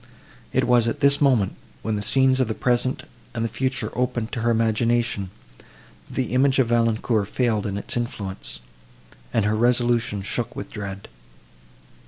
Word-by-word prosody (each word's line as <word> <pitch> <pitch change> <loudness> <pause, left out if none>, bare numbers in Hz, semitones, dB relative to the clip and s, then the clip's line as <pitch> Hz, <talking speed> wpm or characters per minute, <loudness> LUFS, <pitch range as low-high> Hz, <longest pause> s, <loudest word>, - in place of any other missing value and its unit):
It - - +2
was 120 -2 +4
at 115 - -2
this 140 +1 +3
moment, 125 -9 +3 0.3
when 110 0 -1
the 105 - -2
scenes 130 +4 +3
of 130 - +2
the 110 - -2
present 125 +1 0 0.3
and 115 -1 -1
the - - +1
future 120 -1 -2
opened 125 -2 -1
to 115 - -3
her 120 - +1
imagination, 115 -2 +1 0.3
that - - -20 0.5
the - - -1
image 135 +1 +3
of 130 -4 +3
Valancourt 115 -2 +1
failed 110 -3 0
in 100 0 -3
its 100 - -4
influence, 100 - -4 0.7
and 110 - +1
her 105 +1 +2
resolution 120 -2 +2
shook 120 +4 -2
with - - -7
dread. 100 -2 -6
115 Hz, 165 wpm, -23 LUFS, 110-125 Hz, 0.7 s, was